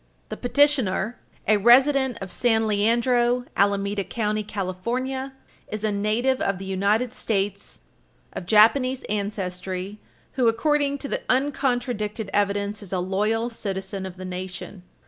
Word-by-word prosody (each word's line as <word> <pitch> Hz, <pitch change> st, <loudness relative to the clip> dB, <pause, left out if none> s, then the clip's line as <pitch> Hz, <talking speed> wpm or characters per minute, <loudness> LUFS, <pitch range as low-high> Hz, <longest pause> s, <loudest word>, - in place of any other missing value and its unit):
The -, -, -5 dB
petitioner, 245 Hz, -6 st, +2 dB, 0.3 s
a 215 Hz, -, +5 dB
resident 260 Hz, +3 st, +5 dB
of 190 Hz, -1 st, -6 dB
San 225 Hz, 0 st, +2 dB
Leandro, 240 Hz, +3 st, +2 dB
Alameda 200 Hz, 0 st, +1 dB
County, 215 Hz, 0 st, -1 dB
California, 235 Hz, +8 st, -3 dB, 0.3 s
is 215 Hz, 0 st, -5 dB
a 215 Hz, -, +1 dB
native 220 Hz, +6 st, 0 dB
of 195 Hz, -1 st, 0 dB
the 195 Hz, -, -7 dB
United 205 Hz, +6 st, +1 dB
States 200 Hz, -4 st, -2 dB, 0.5 s
of 175 Hz, -, -6 dB
Japanese 255 Hz, +5 st, +4 dB
ancestry 195 Hz, -1 st, -3 dB, 0.3 s
who, 250 Hz, -3 st, +1 dB
according 285 Hz, +4 st, +2 dB
to 280 Hz, -, -6 dB
the -, -, -2 dB
uncontradicted 245 Hz, -6 st, 0 dB
evidence, 205 Hz, +1 st, 0 dB
is 200 Hz, -, -10 dB
a 190 Hz, -, 0 dB
loyal 210 Hz, +6 st, 0 dB
citizen 195 Hz, -3 st, -4 dB
of 185 Hz, -1 st, -10 dB
the 185 Hz, -, -7 dB
nation. 185 Hz, +1 st, -6 dB
215 Hz, 130 wpm, -24 LUFS, 195-245 Hz, 0.5 s, a